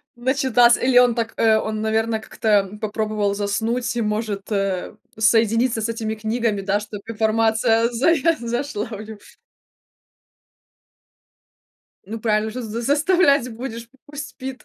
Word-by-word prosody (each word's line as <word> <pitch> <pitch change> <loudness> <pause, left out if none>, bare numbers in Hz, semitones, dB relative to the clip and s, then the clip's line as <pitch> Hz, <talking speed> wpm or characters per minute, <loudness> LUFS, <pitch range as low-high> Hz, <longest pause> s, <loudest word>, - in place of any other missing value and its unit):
Начитался 245 -1 +3
или 250 -1 +3
он 245 -1 +5
так 225 -1 -2
э, 220 -1 +4
он, 215 0 -3
наверное, 220 +1 0
как-то 210 -2 0
попробовал 215 -1 -1
заснуть 225 +5 -1
и, 235 - -1
может, 210 -1 -3
э, 195 0 -2 0.2
соединиться 225 +1 +2
с 225 - -2
этими 220 -1 -3
книгами, 220 -1 -1
да, 200 +1 0
чтобы 210 -1 -9
информация 225 +1 +2
зая 320 +6 +2
зашла 240 -1 -3
в 215 -2 -7
него. 215 -1 -10 2.9
Ну, 225 +2 -6
правильно, 215 -1 0
что 255 - -5
ж, 235 - -6
заставлять 280 - +2
будешь, 230 -1 -7 0.2
пусть 290 0 -7
спит. 260 -1 -8
225 Hz, 130 wpm, -21 LUFS, 215-245 Hz, 2.9 s, он